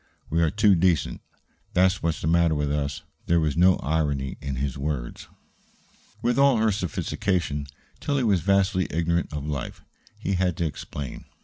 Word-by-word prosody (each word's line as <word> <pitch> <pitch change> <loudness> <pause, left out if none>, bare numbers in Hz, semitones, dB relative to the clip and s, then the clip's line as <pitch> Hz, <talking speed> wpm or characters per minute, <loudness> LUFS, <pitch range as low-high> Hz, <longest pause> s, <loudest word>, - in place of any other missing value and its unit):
We 85 +2 +2
are 80 - +3
too 105 +1 +4
decent; 85 -3 +1 0.5
that's 95 +1 +3
what's 85 -1 -1
the - - -2
matter 85 -1 +3
with 75 -1 -1
us." 70 -1 -2 0.2
There 85 0 +4
was 75 -3 0
no 90 +2 +5
irony 70 -3 -1
in 70 -1 -3
his 65 0 -2
words. 70 -4 -4 1.0
With 120 +2 +2
all 140 -3 +5
her 110 0 +3
sophistication, 90 -5 -2 0.3
Tillie 140 -2 0
was 100 -6 +2
vastly 95 -1 +2
ignorant 85 +1 0
of 75 -2 -4
life. 75 -3 -5 0.3
He 100 - -2
had 90 -2 0
to 85 - 0
explain. 70 -3 -6
85 Hz, 165 wpm, -25 LUFS, 75-95 Hz, 1.0 s, no